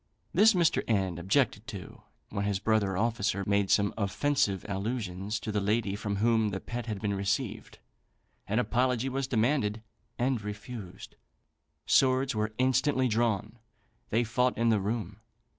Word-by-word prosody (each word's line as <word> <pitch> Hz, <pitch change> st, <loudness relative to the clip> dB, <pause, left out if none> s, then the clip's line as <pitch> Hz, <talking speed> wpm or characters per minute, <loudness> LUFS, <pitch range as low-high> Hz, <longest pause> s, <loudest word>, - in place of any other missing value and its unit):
This 220 Hz, 0 st, +6 dB
Mr. 170 Hz, -3 st, +3 dB
N 95 Hz, -6 st, 0 dB
objected 95 Hz, +3 st, +1 dB
to; -, -, -8 dB, 0.3 s
when 100 Hz, -1 st, -2 dB
his 100 Hz, -2 st, 0 dB
brother 100 Hz, -2 st, +1 dB
officer 110 Hz, -2 st, 0 dB
made 100 Hz, -1 st, +1 dB
some 100 Hz, -1 st, +3 dB
offensive 100 Hz, -1 st, 0 dB
allusions 100 Hz, -1 st, -3 dB
to 110 Hz, -, -4 dB
the 105 Hz, -1 st, 0 dB
lady 105 Hz, 0 st, 0 dB
from 105 Hz, 0 st, -3 dB
whom 110 Hz, +1 st, +2 dB
the 95 Hz, -1 st, -3 dB
pet 120 Hz, +3 st, -6 dB
had 105 Hz, -3 st, -3 dB
been 105 Hz, -1 st, -1 dB
received. 100 Hz, +5 st, -2 dB, 0.7 s
An 110 Hz, -, 0 dB
apology 125 Hz, +1 st, +1 dB
was 135 Hz, 0 st, -2 dB
demanded, 115 Hz, -3 st, +1 dB, 0.3 s
and 125 Hz, -1 st, 0 dB
refused. 105 Hz, -2 st, -8 dB, 0.7 s
Swords 130 Hz, 0 st, +3 dB
were 110 Hz, 0 st, -1 dB
instantly 130 Hz, +1 st, +2 dB
drawn; 115 Hz, -1 st, 0 dB, 0.5 s
they 115 Hz, +2 st, +2 dB
fought 125 Hz, +2 st, +1 dB
in 115 Hz, 0 st, +2 dB
the 110 Hz, -2 st, +3 dB
room. 105 Hz, -1 st, -3 dB
110 Hz, 145 wpm, -29 LUFS, 100-125 Hz, 0.7 s, This